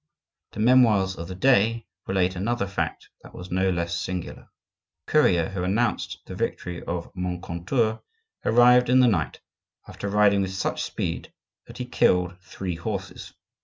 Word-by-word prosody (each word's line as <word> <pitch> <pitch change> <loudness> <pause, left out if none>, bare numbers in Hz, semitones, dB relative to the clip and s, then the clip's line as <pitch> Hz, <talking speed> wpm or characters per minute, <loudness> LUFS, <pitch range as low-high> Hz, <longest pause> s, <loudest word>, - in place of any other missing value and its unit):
The - - -8
memoirs 110 -5 +4
of 85 -1 -7
the 95 - -7
day 115 0 +3 0.2
relate 95 -1 +1
another 105 +4 -1
fact 100 0 -4
that - - -15
was 90 +1 -9
no 95 +1 +2
less 85 -1 -1
singular. 90 0 -5 0.6
The - - -11
courier 85 -2 +3
who 95 -2 -4
announced 105 +5 -1
the - - -8
victory 90 -1 -3
of 85 0 -5
Moncontour 90 +5 -2 0.4
arrived 125 +1 +5
in 130 +1 +5
the 125 - +6
night, 90 -10 -1 0.5
after 100 - -6
riding 100 -1 +4
with 95 0 -2
such 95 - -2
speed - - -4 0.4
that - - -11
he 125 - -4
killed 90 -6 +1
three 95 -1 -6
horses. 95 +1 -6
95 Hz, 155 wpm, -25 LUFS, 90-115 Hz, 0.6 s, the